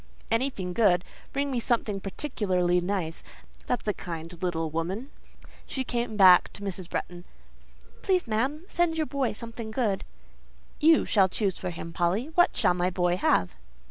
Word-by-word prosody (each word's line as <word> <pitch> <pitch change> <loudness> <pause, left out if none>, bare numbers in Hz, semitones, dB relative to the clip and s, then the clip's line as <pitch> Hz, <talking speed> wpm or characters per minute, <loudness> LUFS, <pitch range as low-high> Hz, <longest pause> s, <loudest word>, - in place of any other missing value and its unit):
"Anything 225 -7 -1
good. 180 -4 +3 0.3
Bring 280 0 -1
me 250 - 0
something 225 -4 0
particularly 185 -5 0
nice; 175 -3 -2 0.5
that's 245 -3 -1
a 210 - +2
kind 165 -1 -7
little 165 -3 -1
woman." 190 - -3 0.6
She 265 - -2
came 235 -3 -2
back 185 -3 +7
to 205 - -8
Mrs. 185 -3 -5
Bretton. 175 0 -4 0.8
"Please, 370 -2 +1
ma'am, 260 +8 -1
send 345 -3 0
your 315 - +1
boy 280 -4 -1
something 230 0 -6
good." 220 -4 -1 0.8
"You 320 +1 +5
shall 195 -3 +4
choose 195 -1 -1
for 185 - -3
him, 165 -1 -7
Polly; 190 - 0
what 350 +1 +3
shall - - +4
my 180 0 0
boy 175 -1 +1
have?" 90 - +2
200 Hz, 155 wpm, -27 LUFS, 180-250 Hz, 0.8 s, back